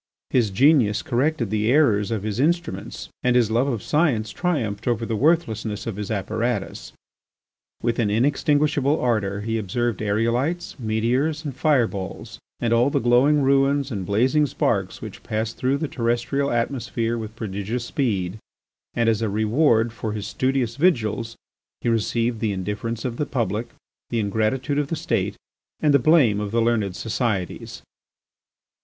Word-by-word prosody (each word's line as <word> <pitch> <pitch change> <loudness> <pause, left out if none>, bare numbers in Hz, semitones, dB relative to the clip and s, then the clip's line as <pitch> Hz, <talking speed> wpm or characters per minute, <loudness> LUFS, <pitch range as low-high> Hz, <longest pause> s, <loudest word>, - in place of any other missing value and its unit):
His 120 -5 +3
genius 120 0 +3
corrected 125 -3 0
the 110 +2 +1
errors 115 -9 +3
of 110 -3 -2
his 110 +1 -3
instruments 170 +4 -1
and 125 -1 +2
his 120 -3 +3
love 120 +4 +2
of 120 -7 -2
science 140 -9 +1
triumphed 120 - -2
over 120 -1 0
the 115 - -2
worthlessness 115 -7 0
of 115 - -4
his 105 -1 -4
apparatus. 110 +1 -2 0.9
With 120 0 0
an 110 -3 +2
inextinguishable 145 +4 +2
ardour 105 -5 0
he 110 +1 -1
observed 115 +2 -2
aerolites, 120 - 0
meteors, 125 +8 0
and 140 -4 -4
fire 135 -3 +3
balls, 95 -4 -7 0.2
and 115 -1 +1
all 120 +3 +4
the - - 0
glowing 130 +5 +4
ruins 140 +1 +2
and 100 -4 -3
blazing 130 +10 +2
sparks - - -1
which - - -8
pass 110 +1 -2
through 130 +2 0
the 155 - -2
terrestrial 120 +3 -1
atmosphere 115 -1 -1
with 110 -1 -6
prodigious 110 +2 -4
speed, 105 -8 -1 0.6
and 115 -1 +1
as 115 -1 +2
a 110 - 0
reward 110 +2 +2
for 110 -2 -4
is 105 -1 -4
studious 130 0 -1
vigils 115 - +1 0.5
he - - 0
received 115 +1 0
the 110 -2 0
indifference 105 +5 -4
of 120 -2 -3
the 150 - -1
public, 115 -3 -1 0.4
the 115 - -1
ingratitude 110 +7 0
of 145 - -1
the 165 - -2
State 165 +2 -1 0.4
and 150 -2 +3
the 140 - +6
blame 125 -7 +4
of 105 -1 -3
the 115 +3 0
learned 110 -5 +1
societies. 110 -5 -3
115 Hz, 155 wpm, -23 LUFS, 110-135 Hz, 0.9 s, the